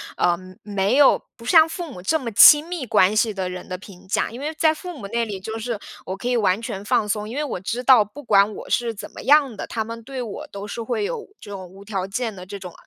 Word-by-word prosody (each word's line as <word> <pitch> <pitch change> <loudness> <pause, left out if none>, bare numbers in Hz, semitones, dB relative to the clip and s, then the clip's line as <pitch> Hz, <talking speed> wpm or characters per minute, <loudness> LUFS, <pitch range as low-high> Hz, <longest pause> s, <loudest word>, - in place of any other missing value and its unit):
呃， 175 -1 +2 0.3
没 200 +1 0
有 285 -1 +5
不 230 - -15
像 320 +4 +6
父 330 -1 -6
母 180 - -9
这 255 - +1
么 245 -6 -5
亲 295 +8 +8
密 350 -7 -4
关 205 -3 +4
系 215 0 +2
的 190 -2 -3
人 180 0 -7
的 185 - -5
评 190 -1 -14
价。 205 - 0
因 240 - -8
为 300 +3 -3
在 315 -1 +4
父 355 +1 -8
母 200 - -7
那 235 +1 0
里， 200 -4 -6
就 220 +3 -5
是 235 0 -3 0.3
我 190 - -4
可 240 +5 -4
以 245 - +2
完 195 -1 +2
全 200 -4 -5
放 210 - +1
松， 210 +1 -2
因 235 - -6
为 300 - -1
我 260 -10 -4
知 235 +6 -4
道 250 -4 +6
不 285 +9 -12
管 205 -3 +3
我 - - -9
是 235 -2 0
怎 205 - -8
么 - - -10
样 280 -5 +4
的， - - -5
他 225 - -2
们 230 +1 -8
对 265 0 -6
我 220 -4 -6
都 200 0 -8
是 230 +3 -6
会 245 - -2
有 465 0 -4
这 205 - -10
种 190 -2 -7
无 195 +2 -14
条 195 -2 -3
件 225 +3 -3
的 180 -2 -10
这 200 +2 -7
种， 185 -3 -9
220 Hz, 295 characters per minute, -22 LUFS, 195-260 Hz, 0.3 s, 亲